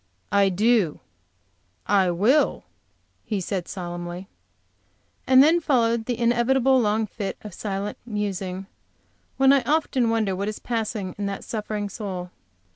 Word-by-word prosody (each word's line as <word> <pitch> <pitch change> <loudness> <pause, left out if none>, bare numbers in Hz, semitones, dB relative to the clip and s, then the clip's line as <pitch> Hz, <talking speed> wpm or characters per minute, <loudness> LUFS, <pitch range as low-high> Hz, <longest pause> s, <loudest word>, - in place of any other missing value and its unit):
"I 200 0 +4
do, 205 -3 +2 0.9
I 195 -3 +3
will," 215 - +2 0.6
he 210 -3 -2
said, 185 -1 -3
solemnly. 175 0 -6 1.0
And 260 0 +7
then 325 +4 +4
followed 235 -7 +1
the 245 -1 -2
inevitable 245 +2 +3
long 215 0 +1
fit 200 -1 -5
of 210 -3 -8
silent 200 +1 -4
musing, 195 -4 -3 0.7
when 270 +1 +6
I 275 - +4
often 280 -6 +1
wonder 220 -4 +1
what 200 +2 -3
is 215 - -3
passing 215 -5 -3
in 200 - -1
that 200 -1 -5
suffering 210 -2 -3
soul. 185 -4 -6
210 Hz, 130 wpm, -24 LUFS, 195-240 Hz, 1.0 s, And